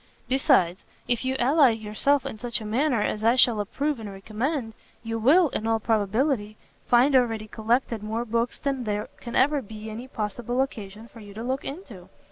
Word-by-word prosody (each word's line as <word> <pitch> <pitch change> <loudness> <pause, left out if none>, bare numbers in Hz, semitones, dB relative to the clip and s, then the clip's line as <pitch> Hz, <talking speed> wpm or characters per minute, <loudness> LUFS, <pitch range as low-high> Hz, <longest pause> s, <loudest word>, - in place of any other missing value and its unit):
Besides, 255 - +2 0.2
if 240 0 0
you 260 0 -1
ally 275 +2 +5
yourself 225 +6 0
in 215 - -6
such 240 0 -2
a 220 - -8
manner 235 +1 +1
as 210 0 -2
I 230 +2 +4
shall 240 -3 +5
approve 275 +7 -2
and 215 -2 -7
recommend, 225 +5 -3 0.3
you 225 0 -3
will, 305 +8 +5
in 220 - -3
all 225 0 +2
probability, 220 +1 0 0.3
find 255 +3 +4
already 225 -4 +2
collected 230 +1 -1
more 220 +3 -3
books 235 +1 -1
than 270 -3 -2
there 210 0 -2
can 235 - -7
ever 285 +2 +3
be 220 -1 -9
any 235 +4 -7
possible 240 +1 -3
occasion 215 -4 -8
for 235 - -15
you 205 -2 -12
to 225 - -5
look 260 +2 -2
into. 255 - -8
230 Hz, 185 wpm, -25 LUFS, 215-260 Hz, 0.3 s, ally